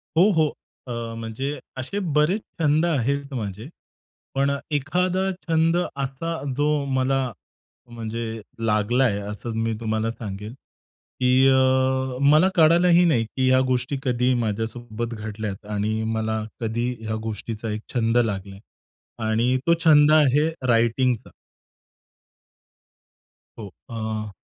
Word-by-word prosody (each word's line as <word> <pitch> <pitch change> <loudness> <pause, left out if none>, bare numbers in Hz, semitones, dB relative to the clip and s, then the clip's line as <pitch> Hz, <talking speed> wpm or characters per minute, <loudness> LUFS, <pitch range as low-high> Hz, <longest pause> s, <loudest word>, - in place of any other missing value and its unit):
हो, 185 +6 +6
हो. 160 -4 +3 0.4
अ, 115 -1 -4
म्हणजे 130 +6 -4 0.2
असे 140 +10 -3 0.2
बरेच 160 +8 +3 0.2
छंद 155 +1 +3
आहेत 140 -2 -1
माझे. 110 -1 -5 0.7
पण 140 +1 +2 0.2
एखादा 180 +6 0 0.2
छंद 165 +1 +3
असा 140 -1 -3 0.2
जो 145 0 +2 0.3
मला 135 +1 +2 0.7
म्हणजे 115 -1 -5 0.2
लागलाय, 110 +1 +2
असं 105 +3 -6
मी 115 0 0
तुम्हाला 110 0 -1
सांगेन 105 -1 -7 0.7
की 125 - +2 0.2
अ, 130 0 +2
मला 155 +6 +5
कळालही 170 +2 +5
नाही, 125 -9 +2
की 130 +3 0
ह्या 130 0 +5
गोष्टी 130 +2 -1
कधी 125 -1 +1
माझ्यासोबत 115 +2 -4
घडल्यात 105 -2 -5
आणि 110 +2 -1
मला 110 0 -1 0.2
कधी 115 +2 -1
ह्या 110 0 -3
गोष्टीचा 110 0 -5
एक 105 +1 -4
छंद 115 -1 +1
लागलाय. 100 -4 -1 0.7
आणि 120 +4 +2
तो 170 - +6
छंद 150 -1 +7
आहे 150 0 +4 0.2
रायटिंगचा. 120 +1 +2 2.3
हो. 105 - -6 0.2
अ, 110 -2 -4
125 Hz, 115 wpm, -23 LUFS, 110-145 Hz, 2.3 s, छंद